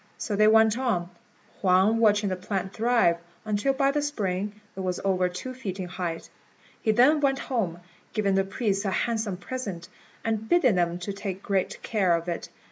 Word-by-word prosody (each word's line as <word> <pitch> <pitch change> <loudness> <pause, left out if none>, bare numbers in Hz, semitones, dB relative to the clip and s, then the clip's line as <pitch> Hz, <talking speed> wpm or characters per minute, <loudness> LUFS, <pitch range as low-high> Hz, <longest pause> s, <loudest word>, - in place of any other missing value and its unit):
So 210 - -3
they 215 +1 +5
went 220 +1 +5
on, 185 -9 -1 0.5
Huang 190 +4 +4
watching 210 -2 +3
the 185 - -1
plant 190 +1 -3
thrive, 225 -7 +3 0.3
until 215 +5 +1
by 275 0 +2
the 295 +1 0
spring 210 -7 -2 0.2
it - - -8
was 185 -1 -2
over 185 -2 +2
two 180 +9 -6
feet 205 -7 -6
in 185 - -3
height. 175 -2 -4 0.5
He 220 - +2
then 260 +8 +5
went 270 -1 +2
home, 195 -12 -2 0.3
giving 205 -3 +1
the 195 0 +3
priests 195 0 -1
a 200 - 0
handsome 220 -1 -1
present, 185 -5 -6 0.4
and 220 -1 -1
bidding 310 -10 +4
them 175 -1 +1
take 195 +1 -5
great 195 -2 -1
care 190 -6 +2
of 170 +1 -4
it. 170 - -4
200 Hz, 180 wpm, -26 LUFS, 185-230 Hz, 0.5 s, they